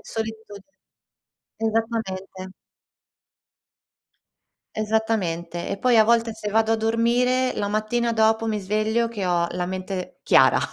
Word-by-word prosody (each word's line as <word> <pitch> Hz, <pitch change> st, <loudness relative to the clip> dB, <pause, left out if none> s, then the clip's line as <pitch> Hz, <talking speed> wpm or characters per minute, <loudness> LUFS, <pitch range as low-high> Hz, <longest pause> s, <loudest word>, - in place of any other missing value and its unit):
Solitu 220 Hz, -1 st, -6 dB, 1.0 s
esattamente. 220 Hz, -4 st, -3 dB, 2.3 s
Esattamente. 210 Hz, -6 st, -1 dB
E 200 Hz, -, -3 dB
poi 250 Hz, -2 st, +3 dB
a 220 Hz, -, +7 dB
volte 230 Hz, 0 st, +2 dB
se 210 Hz, -1 st, -5 dB
vado 220 Hz, +1 st, +2 dB
a -, -, +2 dB
dormire, 240 Hz, +3 st, +1 dB
la 205 Hz, -, -2 dB
mattina 215 Hz, +3 st, -1 dB
dopo 220 Hz, 0 st, +2 dB
mi 215 Hz, -2 st, -1 dB
sveglio 215 Hz, +4 st, 0 dB
che 210 Hz, -5 st, -5 dB
ho 175 Hz, -1 st, +1 dB
la 180 Hz, 0 st, -2 dB
mente 185 Hz, 0 st, -5 dB
chiara. -, -, +5 dB
220 Hz, 115 wpm, -23 LUFS, 195-225 Hz, 2.3 s, a